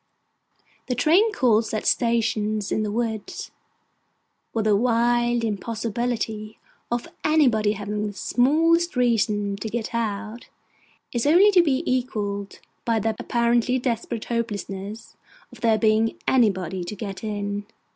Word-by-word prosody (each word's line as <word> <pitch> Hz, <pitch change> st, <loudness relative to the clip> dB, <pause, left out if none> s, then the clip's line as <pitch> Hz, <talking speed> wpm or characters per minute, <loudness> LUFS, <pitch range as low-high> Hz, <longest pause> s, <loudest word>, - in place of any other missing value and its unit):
The 250 Hz, -, -1 dB
train 340 Hz, -, +4 dB
calls 230 Hz, -, +2 dB
at 215 Hz, -, -3 dB
stations 215 Hz, -3 st, +1 dB
in -, -, +1 dB
the 215 Hz, -, -1 dB
woods, 220 Hz, -2 st, -3 dB, 1.0 s
where 225 Hz, -, -1 dB
the 210 Hz, -1 st, +3 dB
wild 240 Hz, +1 st, +2 dB
impossibility 220 Hz, 0 st, -3 dB, 0.3 s
of 240 Hz, 0 st, -2 dB, 0.2 s
anybody 245 Hz, -9 st, +3 dB
having 210 Hz, 0 st, -3 dB
the 205 Hz, -, -6 dB
smallest 325 Hz, -, +2 dB
reason 210 Hz, -4 st, +1 dB
to 220 Hz, -, -5 dB
get 230 Hz, +1 st, -4 dB
out, 220 Hz, 0 st, -3 dB, 0.6 s
is 240 Hz, +2 st, 0 dB
only 370 Hz, +7 st, +6 dB
to 370 Hz, -3 st, +6 dB
be 285 Hz, -2 st, +1 dB
equalled 205 Hz, -, -2 dB, 0.2 s
by 230 Hz, -1 st, +1 dB
the 220 Hz, +1 st, -1 dB
apparently 240 Hz, +1 st, +1 dB
desperate 235 Hz, -3 st, -3 dB
hopelessness 210 Hz, -2 st, -4 dB, 0.3 s
of 245 Hz, -2 st, -15 dB
there 225 Hz, -2 st, +3 dB
being 220 Hz, +1 st, +2 dB
anybody 190 Hz, -8 st, +2 dB
to 190 Hz, +5 st, -6 dB
get 195 Hz, -1 st, -6 dB
in. 205 Hz, -1 st, -3 dB
225 Hz, 125 wpm, -24 LUFS, 210-240 Hz, 1.0 s, only